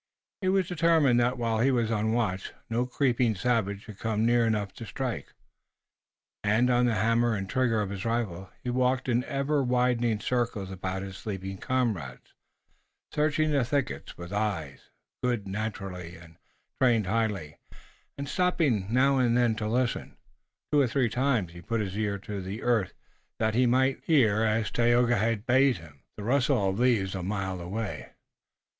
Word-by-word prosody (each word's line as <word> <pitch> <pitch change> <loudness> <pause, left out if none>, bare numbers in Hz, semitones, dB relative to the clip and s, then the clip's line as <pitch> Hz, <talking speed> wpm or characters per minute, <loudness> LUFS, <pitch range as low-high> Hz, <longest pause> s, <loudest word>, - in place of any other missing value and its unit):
He 185 - +1
was 190 -2 +2
determined 160 -7 +3
that, 125 +2 +1
while 115 -2 0
he 125 +4 +3
was 120 -4 +1
on 110 0 +1
watch, 105 -5 -1 0.2
no 120 +2 0
creeping 125 -3 +1
savage 100 -2 0
should 105 -3 -11
come 110 -1 0
near 120 0 +3
enough 105 -3 -1
to 115 - -8
strike. 130 0 -4 1.1
Hand 110 +5 +3
on 125 0 +3
the 115 - +1
hammer 115 +3 +2
and 95 -2 -4
trigger 120 -1 +1
of 100 -2 -3
his 95 -2 -5
rifle 105 -6 -2
he 125 - -2
walked 125 +1 +1
in 120 -1 +2
an 125 - -6
ever 140 +1 0
widening 125 -3 +1
circle 120 -3 -1
about 95 +1 -4
his 95 -1 -7
sleeping 95 -2 -5
comrades, 105 - -2 0.8
searching 155 +1 +1
the 140 -3 +2
thickets 140 +3 -2
with 85 +2 -8
eyes, 100 -9 -3 0.3
good 120 -5 -1
naturally 95 -4 -5
and 85 -1 -15 0.4
trained 120 -5 +4
highly, 105 -7 -1 0.6
and 140 0 -4
stopping 145 - +1
now 135 +2 +3
and 120 -1 +3
then 120 -2 +3
to 110 -1 -3
listen. 125 +1 -1 0.5
Two 150 - +4
or 135 - +3
three 125 -1 +1
times 120 -6 0
he 85 0 -11
put 115 +5 -2
his 100 -3 -3
ear 105 -1 -1
to 100 0 -6
the 95 +4 -6
earth 115 -6 +1 0.4
that 110 0 +1
he 125 +2 +3
might 130 +2 +2
hear, 115 -10 +4
as 110 -1 +1
Tayoga 120 0 +3
had 110 +1 0
bade 130 -1 +4
him, 75 -4 -15 0.2
the 105 - -6
rustle 120 -5 +2
of 95 - -4
leaves 115 -7 +2
a 95 - -4
mile 95 -1 -3
away. 100 +4 -5
115 Hz, 170 wpm, -28 LUFS, 100-125 Hz, 1.1 s, trained